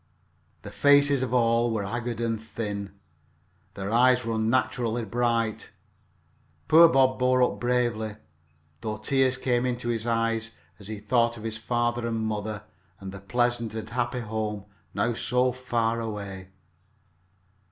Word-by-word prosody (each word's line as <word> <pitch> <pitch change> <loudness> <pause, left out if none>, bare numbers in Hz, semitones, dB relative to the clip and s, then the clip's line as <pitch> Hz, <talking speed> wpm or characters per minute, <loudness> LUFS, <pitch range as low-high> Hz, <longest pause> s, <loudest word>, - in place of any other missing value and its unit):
The - - -8
faces 145 -1 +4
of 130 -2 -2
all 120 -1 +3
were 110 -3 -1
haggard 120 +2 -4
and 115 -2 -1
thin. 105 -3 -5 0.8
Their 100 +1 -4
eyes 125 +1 +4
were 115 - -1
unnaturally 115 0 0
bright. 115 0 -1 1.0
Poor 165 +1 +8
Bob 130 -3 +3
bore 125 0 +3
up - - 0
bravely, 120 -3 0 0.6
though 110 +3 -4
tears 130 +3 +1
came 120 -1 0
into 120 -1 -2
his 115 -1 -2
eyes 115 -1 0 0.3
as 100 - -11
he 110 0 -5
thought 115 +2 +1
of 110 - -10
his 110 -1 -4
father 120 0 -1
and 115 -1 -2
mother, 105 -1 -3 0.4
and 95 -1 -7
the 100 - -9
pleasant 120 +2 -1
and 110 - -6
happy 120 0 -1
home 105 -2 -4 0.3
now 115 +4 +1
so 125 +2 +1
far 115 -2 -1
away. 100 -4 -6
115 Hz, 140 wpm, -26 LUFS, 110-125 Hz, 1.0 s, Poor